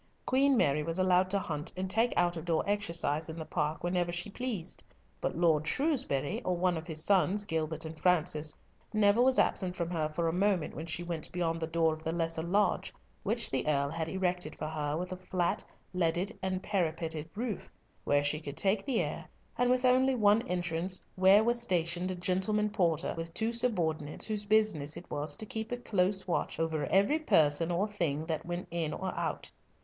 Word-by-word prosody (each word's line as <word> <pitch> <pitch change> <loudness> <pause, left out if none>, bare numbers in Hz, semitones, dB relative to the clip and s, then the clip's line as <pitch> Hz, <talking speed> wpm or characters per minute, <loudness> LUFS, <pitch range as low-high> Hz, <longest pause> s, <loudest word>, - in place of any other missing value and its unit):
Queen 270 +1 +3
Mary 145 -6 +3
was 165 +3 -2
allowed 185 0 +3
to 200 - +2
hunt 155 -4 -3
and 190 +1 -2
take 225 +5 +2
out 175 0 +3
of 165 - -5
door 165 -2 +1
exercise 170 -6 -1
in 160 - -6
the 160 - -5
park 155 -1 -2
whenever 175 0 0
she 175 +4 -3
pleased, 225 -8 -4 0.4
but - - -2
Lord 160 -3 +3
Shrewsbury, 230 - 0
or 180 -6 -1
one 180 0 +2
of 160 +1 -6
his 160 -2 -2
sons, 200 +1 +3
Gilbert 160 -2 -2
and 160 0 -8
Francis, 155 -4 +1 0.3
never 215 +1 +4
was 260 +1 +4
absent 180 -2 +2
from 170 -1 -3
her 155 -3 0
for 165 +2 -1
a 165 - 0
moment 190 -3 +1
when 160 - -6
she 165 +2 -3
went 170 -3 -4
beyond 165 -2 -1
the 160 - -2
door 165 -1 +2
of 155 0 -9
the 160 - -1
lesser 165 -1 -1
lodge, 200 +5 +1 0.3
which 225 +3 -1
the 130 +1 -1
Earl 140 -1 +1
had 160 0 -2
erected 180 -4 -1
for - - -5
her, 150 -1 -2
with 180 +2 -4
a 185 - -4
flat, 185 -1 -1 0.3
leaded, 180 +3 0
and 185 0 -2
parapeted 165 -5 -2
roof, 225 -2 -4 0.3
where 145 0 +2
she 145 +1 +1
could 140 -2 -8
take 195 +1 +2
the 265 -5 +1
air, - - -4 0.3
and 245 0 +2
with 255 0 +2
only 260 +1 +4
one 210 -1 +4
entrance, 175 +1 -1 0.2
where 190 +3 +6
was 235 +1 +1
stationed 175 -3 0
a 185 - -2
"gentleman 190 +4 0
porter," 175 -7 +1
with 165 0 -5
two 225 +1 0
subordinates, 170 -11 0
whose 210 -2 -3
business 205 -9 +2
it 170 - -11
was 145 0 -1
to 215 - -4
keep 220 +2 -4
a 245 - -1
close 190 -4 0
watch 175 - -2
over 160 -2 -1
every 200 +11 +3
person 165 - +3
or 180 +4 +1
thing 160 -7 -2
that 160 0 -3
went 175 +1 -3
in 165 -3 -2
or 190 -1 -3
out. - - -3
175 Hz, 200 wpm, -31 LUFS, 160-205 Hz, 0.4 s, where